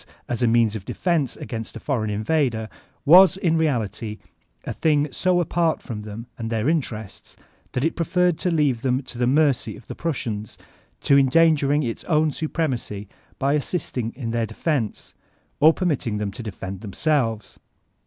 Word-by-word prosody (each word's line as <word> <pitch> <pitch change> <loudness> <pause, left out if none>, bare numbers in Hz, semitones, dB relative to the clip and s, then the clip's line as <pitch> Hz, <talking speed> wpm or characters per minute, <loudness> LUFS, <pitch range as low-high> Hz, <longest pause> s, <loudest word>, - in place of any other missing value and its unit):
as 120 0 -3
a 120 - +4
means 115 -2 +3
of 105 - -5
defense 160 - 0
against 115 -2 -6
a - - -6
foreign 115 -7 -1
invader, 110 +1 0 0.4
was 185 +4 +8
in 170 -4 +1
reality 115 - -1 0.5
a - - -4
thing 150 -2 +2
so 180 +5 +1
apart 170 -1 +1
from 110 -4 -6
them 105 +2 -8
and 115 -1 -3
their 115 +1 -1
interests 120 - -3 0.4
that 125 - -1
it 165 - 0
preferred 180 +1 +2
to 180 - 0
leave 145 -8 +1
them 130 +1 0
to 125 -1 -9
the 120 - +2
mercy 140 -1 +2
of 120 - -16
the - - -7
Prussians, 115 -10 -3 0.4
to 140 0 +5
endangering 145 +1 +3
its 115 -3 -4
own 155 -2 +2
supremacy 130 -11 -3 0.3
by 140 +1 +1
assisting 135 -6 -2
in 120 -3 -4
their 115 -1 0
defense, 135 -4 -2 0.5
or 155 +2 +7
permitting 150 - -1
them 105 -1 -2
to 105 - -8
defend 95 -3 -6
themselves. 115 - -1
130 Hz, 165 wpm, -23 LUFS, 110-155 Hz, 0.5 s, was